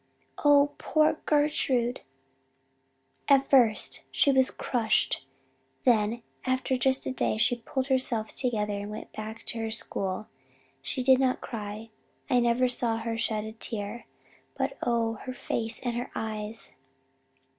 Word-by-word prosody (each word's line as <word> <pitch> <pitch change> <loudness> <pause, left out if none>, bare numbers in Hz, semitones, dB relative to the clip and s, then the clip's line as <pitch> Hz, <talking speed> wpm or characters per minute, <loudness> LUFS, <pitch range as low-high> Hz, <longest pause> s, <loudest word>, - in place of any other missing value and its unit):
"Oh, 290 0 +5
poor 310 0 +2
Gertrude! 275 -5 +2 1.3
At 275 -1 +4
first 240 -6 +5
she 280 - +3
was 260 -1 +4
crushed. 220 - 0 0.6
Then 230 -1 +2 0.2
after 260 0 0
just 260 +1 +2
a - - -2
day 255 - 0
she 240 +2 +3
pulled 265 +2 -2
herself 255 -5 0
together 215 -5 0
and 200 0 -4
went 210 +1 -8
back 215 +1 -7
to 230 - -5
her 225 0 -2
school. 200 -3 -3 0.6
She 135 - -3
did 260 0 +5
not 260 -1 +1
cry 215 0 -7 0.4
I 250 - +5
never 240 +1 +3
saw 240 -2 +1
her 225 0 -3
shed 220 -2 -1
a 220 - -6
tear 220 0 -6 0.5
but - - -1
oh, 230 -2 0
her 255 - -4
face 225 -2 +1
and 240 -2 -2
her 245 +1 -3
eyes! 215 0 -5
235 Hz, 140 wpm, -28 LUFS, 220-260 Hz, 1.3 s, Oh